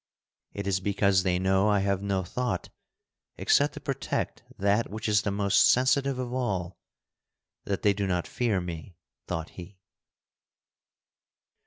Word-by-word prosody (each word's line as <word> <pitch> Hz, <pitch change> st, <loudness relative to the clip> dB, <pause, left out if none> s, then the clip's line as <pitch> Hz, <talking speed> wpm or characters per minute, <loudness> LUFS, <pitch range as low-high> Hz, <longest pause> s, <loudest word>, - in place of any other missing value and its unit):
"It 100 Hz, -, -5 dB
is 95 Hz, -1 st, +1 dB
because 100 Hz, -1 st, +2 dB
they 90 Hz, -1 st, +1 dB
know 95 Hz, +2 st, +2 dB
I 100 Hz, -1 st, +3 dB
have 100 Hz, -1 st, 0 dB
no 100 Hz, -2 st, -1 dB
thought 125 Hz, +6 st, -3 dB, 0.7 s
except -, -, +2 dB
to -, -, -6 dB
protect -, -, -3 dB, 0.2 s
that 100 Hz, +3 st, +1 dB
which 110 Hz, +2 st, -5 dB
is 105 Hz, -1 st, +3 dB
the 105 Hz, -, -2 dB
most 100 Hz, 0 st, +3 dB
sensitive 130 Hz, +1 st, +3 dB
of 125 Hz, -1 st, -4 dB
all, 95 Hz, -9 st, -2 dB, 0.9 s
that 100 Hz, -2 st, -2 dB
they 105 Hz, -, +4 dB
do 100 Hz, 0 st, -2 dB
not 90 Hz, -2 st, 0 dB
fear 115 Hz, -6 st, 0 dB
me," 85 Hz, 0 st, -7 dB, 0.3 s
thought 80 Hz, 0 st, -3 dB
he. 90 Hz, +2 st, -11 dB
100 Hz, 145 wpm, -27 LUFS, 95-105 Hz, 0.9 s, they